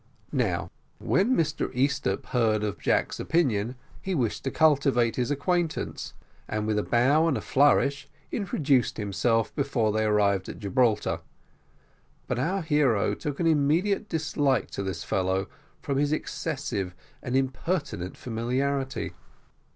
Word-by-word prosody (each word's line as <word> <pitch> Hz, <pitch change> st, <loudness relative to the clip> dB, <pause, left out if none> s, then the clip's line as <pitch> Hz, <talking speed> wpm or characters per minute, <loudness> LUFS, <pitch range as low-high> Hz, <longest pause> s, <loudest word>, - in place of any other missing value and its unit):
Now, -, -, 0 dB, 0.3 s
when 230 Hz, +7 st, +2 dB
Mr 155 Hz, -2 st, 0 dB
Easthupp 135 Hz, -6 st, 0 dB
heard 110 Hz, -4 st, +2 dB
of 100 Hz, -5 st, -3 dB
Jack's -, -, 0 dB
opinions, 125 Hz, -8 st, +1 dB, 0.3 s
he 190 Hz, -1 st, -2 dB
wished 120 Hz, -7 st, -1 dB
to -, -, +1 dB
cultivate 140 Hz, -7 st, +3 dB
his 125 Hz, 0 st, -1 dB
acquaintance, 165 Hz, +3 st, -1 dB, 0.3 s
and 105 Hz, 0 st, -2 dB
with 105 Hz, -1 st, +1 dB
a -, -, -1 dB
bow 140 Hz, +7 st, +3 dB
and 150 Hz, -, +1 dB
a -, -, -2 dB
flourish, 140 Hz, 0 st, +3 dB, 0.2 s
introduced 145 Hz, -, +1 dB
himself 115 Hz, +2 st, 0 dB
before 135 Hz, -7 st, +1 dB
they 110 Hz, +1 st, +1 dB
arrived 100 Hz, -3 st, +2 dB
at -, -, -7 dB
Gibraltar, 110 Hz, +2 st, +1 dB, 1.1 s
but 125 Hz, -, -2 dB
our 180 Hz, +8 st, 0 dB
hero 145 Hz, -, +2 dB
took 145 Hz, -2 st, -5 dB
an 170 Hz, -, +1 dB
immediate 165 Hz, +7 st, +2 dB
dislike 145 Hz, -6 st, 0 dB
to -, -, -4 dB
this 95 Hz, -5 st, -4 dB
fellow 95 Hz, +3 st, 0 dB, 0.4 s
from 140 Hz, -1 st, 0 dB
his 145 Hz, 0 st, +1 dB
excessive 135 Hz, -, -3 dB, 0.3 s
and 125 Hz, -, -3 dB
impertinent 135 Hz, -, -2 dB
familiarity. 130 Hz, +4 st, -2 dB
135 Hz, 135 wpm, -27 LUFS, 110-150 Hz, 1.1 s, cultivate